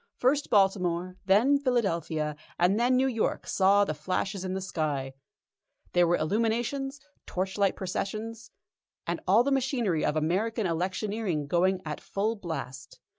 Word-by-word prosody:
First 280 +3 +1
Baltimore, 185 -3 +2
then 240 +9 +5
Philadelphia, 170 - 0 0.2
and 185 +5 +3
then 245 +2 +3
New 260 +1 +3
York 235 -4 -1
saw 200 +1 +4
the 155 - -2
flashes 185 +5 -2
in 185 0 -3
the - - -1
sky. 150 -7 -2 0.8
There 175 -1 +4
were 175 - +3
illuminations, 235 - -1 0.3
torchlight 190 +1 0
processions, 215 +4 -4 0.6
and 170 0 -2
all 210 +6 +5
the 280 - 0
machinery 245 - +1
of 150 - +1
American 195 +8 0
electioneering 185 0 -1
going 185 +4 +1
at 150 -1 -5
full 215 +3 -1
blast. 145 - -7
195 Hz, 135 wpm, -28 LUFS, 170-225 Hz, 0.8 s, then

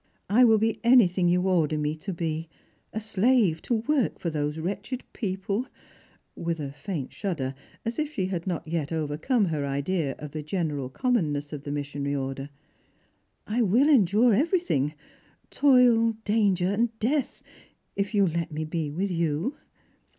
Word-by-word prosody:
I 240 +5 +6
will 225 -2 +6
be 220 +1 0
anything 190 -8 +5
you 180 +1 +2
order 160 -5 +2
me 150 0 -1
to 195 +5 -5
be, 165 -2 -3 0.4
a 220 - -3
slave 215 -5 +2
to 240 - 0
work 260 +3 0
for 170 - -3
those 150 0 -2
wretched 200 +9 -4
people," 200 +3 -2 0.7
with 165 -1 -3
a 140 -2 -4
faint 150 -2 -5
shudder, 155 -10 -3 0.3
as 230 +4 -3
if 305 -1 -1
she 195 -10 -1
had 185 -1 -3
not 170 -2 -3
yet 155 -2 -2
overcome 160 - 0
her 155 -5 -1
idea 140 +2 -1
of 150 -1 -8
the 155 - -4
general 150 -5 -2
commonness 150 - -1
of 145 0 -7
the 145 - -4
missionary 145 0 -3
order. 135 0 -4 0.5
" - - -42
I 225 +4 0
will 235 +8 +4
endure 220 - +5
everything 265 - +1 0.3
— - - -35
toil, 245 -5 +5
danger, 205 +1 +2
death 265 +4 -1 0.3
— - - -43
if 200 +2 -2
you 200 - +5
will 180 - +2
let 170 0 -2
me 155 +1 -3
be 155 -1 -2
with 185 +6 -2
you." 165 - -1
180 Hz, 165 wpm, -26 LUFS, 150-225 Hz, 0.7 s, I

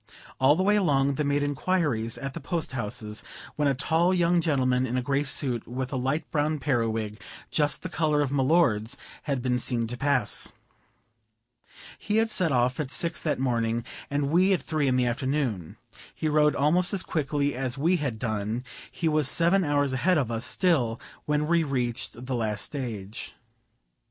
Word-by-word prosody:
All 135 +3 +5
the 185 - 0
way 205 +2 +4
along 140 -7 +2
they 150 - -1
made 145 0 +1
inquiries 145 -6 0
at 135 +2 -5
the - - -5
post 165 +1 -3
houses, 105 -3 -3 0.3
when 150 -1 +1
a 140 - +2
tall 165 +6 +2
young 175 0 +3
gentleman 130 -5 +1
in 125 +1 -2
a - - +1
gray 135 +2 +1
suit, 130 -4 0
with 130 +2 -4
a - - -1
light 135 +5 -2
brown 155 0 +1
periwig, 115 -6 -1 0.3
just 150 -2 +1
the - - -3
color 155 -3 +1
of 135 - -3
my 140 -1 +1
lord's, 130 -5 +2 0.3
had 135 -3 -1
been 125 -1 +1
seen 120 -1 0
to 120 +2 -5
pass. 130 -6 +2 1.5
He 210 +1 -1
had 225 0 +2
set 180 -6 +2
off 125 +1 +1
at 145 -4 -2
six 165 +5 -1
that 155 - 0
morning, 120 -2 0 0.2
and 145 0 -1
we 185 +4 +4
at 165 -8 -1
three 155 -2 0
in 130 - +2
the 125 -1 +2
afternoon. 120 - -2 0.4
He 155 - -2
rode 150 0 +3
almost 175 +7 +2
as 185 - 0
quickly 145 -2 -1
as 130 0 -3
we 170 +6 +2
had 140 -8 -3
done; 110 +1 -2 0.3
he 170 - -3
was 155 -3 +2
seven 175 +6 +3
hours 145 -3 +1
a - - 0
head 180 +6 +3
of 130 -6 0
us 115 +1 -1
still 130 -11 +1 0.3
when 150 0 +1
we 170 +1 +2
reached 125 -3 -3
the 130 - -3
last 110 -4 -1
stage. 115 -8 -6
140 Hz, 185 wpm, -27 LUFS, 125-155 Hz, 1.5 s, All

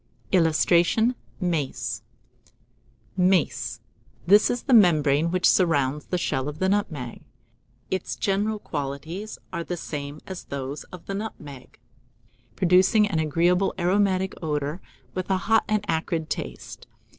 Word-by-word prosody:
[Illustration: 175 +6 +3 0.3
MACE.] 140 - -2 1.1
MACE. 155 -11 +1 0.4
This 205 +4 +6
is 245 - -2
the 265 - +1
membrane 155 - +5
which 180 +1 +2
surrounds 150 -5 +2
the 180 - -1
shell 135 -5 -1
of 150 - -7
the 190 - +1
nutmeg. 160 - -2 0.7
Its 190 - -2
general 205 +2 0
qualities 155 +5 -5 0.2
are 170 -2 -2
the 175 +1 -4
same 145 -2 -6
as 190 -2 -7
those 140 +1 -5
of 180 - -12
the 195 - -4
nutmeg, 150 -11 -7 0.8
producing 190 +4 +4
an 190 -6 -1
agreeable 170 +5 +2
aromatic 190 +1 +1
odour, 150 +1 -2 0.3
with 185 0 -4
a 190 - +3
hot 225 +4 +2
and 215 -1 0
acrid 160 -1 -2
taste. - - -6
175 Hz, 125 wpm, -25 LUFS, 150-195 Hz, 1.1 s, This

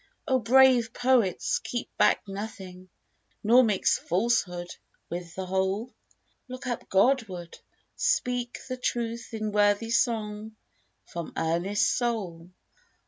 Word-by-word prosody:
O 260 -3 +3
brave 245 0 +5
poets, 245 -8 +2
keep 235 +2 -5
back - - +3
nothing; 190 -2 -8 0.5
Nor 240 +4 +6
mix 210 -5 +2
falsehood 180 -3 0 0.4
with 175 0 -6
the 190 - -4
whole! 190 +6 -1 0.5
Look 255 +1 -8
up 245 -2 -4
Godward! 195 -5 +1 0.4
speak 245 -1 0
the 255 -1 -4
truth 235 -1 -3
in 215 -1 -3
Worthy 205 +2 +2
song 220 -2 -1 0.5
from 170 -1 -7
earnest 175 +7 +1
soul 190 -9 -3
215 Hz, 110 wpm, -27 LUFS, 190-240 Hz, 0.5 s, Nor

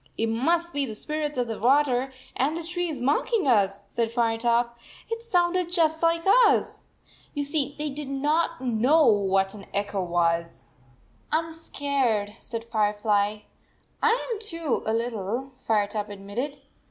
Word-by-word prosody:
"It 225 0 0
must 335 +9 +1
be 285 - 0
the 220 - -6
spirits 300 +3 -3
of 245 - +1
the 225 -2 -4
\vater 265 +1 +3 0.2
and 290 +6 0
the 335 - -5
trees, 345 -4 -2
mocking 295 - +1
us," 200 -5 +3
said 230 -1 -2
Firetop. 235 0 +1 0.4
"It 455 0 -2
sounded 360 -5 +1
just 320 -3 +2
like 330 0 +2 0.2
us." - - 0 0.5
You 290 - 0
see, 285 -1 -1
they 300 -1 -3
did 285 0 -6
not 300 +4 0
know 260 +6 +3
what 195 -3 +3
an 205 -2 -11
echo 200 -1 -1
was, 170 -4 0 0.7
"I 310 - +4
m 325 0 -4
scared," 270 -10 -1
said 230 -1 -6
Firefly. 210 -1 +1 0.6
"I 460 +2 +2
am 430 - -5
too, 335 - -2
a - - +2
little," 230 +2 -2
Firetop 210 -1 0
admitted. 230 +9 -5
250 Hz, 150 wpm, -26 LUFS, 215-315 Hz, 0.7 s, I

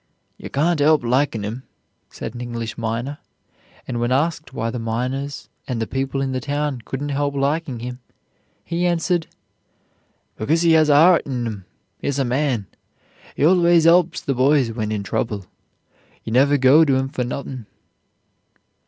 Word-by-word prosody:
"You - - -9
can't 155 +2 +1
'elp 155 -1 +4
likin' 120 -3 0
'im," 115 +5 -5 0.5
said - - -7
an 120 - -7
English 115 -2 -5
miner, 115 +5 -3 0.7
and 120 -2 -3
when 120 +1 0
asked 155 +3 0
why 115 -3 -3
the 125 - -4
miners 130 +5 -3 0.2
and 125 -3 -2
the 115 - -1
people 135 +2 -2
in 135 - -2
the 130 - -1
town 145 -1 -2
couldn't 140 +4 -4
help 140 0 -1
liking 140 -2 -1
him, 125 +1 -6 0.7
he 175 +1 0
answered. 175 0 0 1.1
"Because 160 +10 +1
he 170 - +4
has 155 -1 +5
a - - +6
'eart 170 +3 +5
in 125 -3 -2
'im; 105 -5 -6 0.3
he's 140 - -2
a 135 - +1
man. 125 -4 0 0.7
He 145 - +2
always 170 -1 +5
'elps 170 0 +4
the 135 - -1
boys 130 -1 +3
when 110 -2 -3
in 105 -2 -2
trouble. 100 -1 -3 0.8
You 110 - -5
never 140 +3 +4
go 135 +4 +6
to 140 -4 +2
'im 135 0 -1
for 135 -3 -2
nothin'." 125 -2 -6
135 Hz, 165 wpm, -21 LUFS, 120-150 Hz, 1.1 s, a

